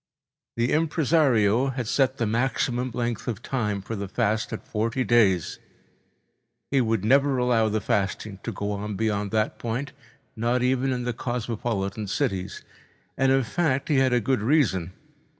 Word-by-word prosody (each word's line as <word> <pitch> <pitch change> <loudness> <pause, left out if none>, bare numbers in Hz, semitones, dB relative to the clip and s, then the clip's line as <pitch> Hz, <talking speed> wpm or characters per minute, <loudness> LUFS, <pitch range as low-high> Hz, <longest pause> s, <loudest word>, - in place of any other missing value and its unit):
The 120 +2 +1
impresario 145 -7 +3
had 125 -3 -3
set 135 +1 +1
the 115 - 0
maximum 125 +2 0
length 120 -1 -3
of 115 -5 -4
time 105 -7 -2
for 115 - -5
the 100 -1 -4
fast 105 +3 -1
at 115 - -6
forty 115 +4 -1
days—he 100 -7 +2 1.2
would 110 -4 0
never 135 +3 +4
allow 120 -3 +2
the 110 0 -1
fasting 100 0 -2
go 105 -2 -4
on 105 +1 -4
beyond 105 -1 -1
that 110 +1 -1
point, 120 +5 -3 0.4
not 120 +2 0
even 130 +1 +1
in 125 -1 -2
the 125 0 -2
cosmopolitan 115 -4 -3
cities. 95 -5 -2 0.5
And, 135 0 +2
in 135 0 +3
fact, 140 +4 -1
he 145 - +3
had 130 -1 +3
a 125 - +3
good 130 +1 0
reason. 105 - +1
115 Hz, 150 wpm, -25 LUFS, 105-130 Hz, 1.2 s, never